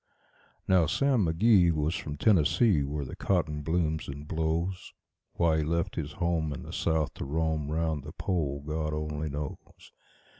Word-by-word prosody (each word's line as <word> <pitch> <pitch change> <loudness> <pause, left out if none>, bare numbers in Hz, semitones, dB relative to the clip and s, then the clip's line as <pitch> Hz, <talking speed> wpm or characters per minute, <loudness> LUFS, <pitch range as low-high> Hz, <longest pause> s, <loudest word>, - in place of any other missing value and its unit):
Now 90 -4 +4
Sam 130 - +2
McGee 90 +1 +5
was 75 0 0
from 75 -4 -5
Tennessee, 95 0 +4
where 70 +1 -3
the - - -7
cotton 80 -6 0
blooms 80 0 -1
and 70 +1 -7
blows. 85 +4 -2 0.4
Why 85 -2 +2
he - - +1
left 85 +2 -1
his 75 -2 -4
home 85 -3 0
in 70 - -6
the - - -9
South 80 -4 0
to - - -6
roam 80 0 -1
'round 80 -2 -1
the - - -8
Pole, 70 -6 -2
God 75 0 -2
only 75 0 -3
knows. 75 0 -7
80 Hz, 160 wpm, -29 LUFS, 75-85 Hz, 0.4 s, McGee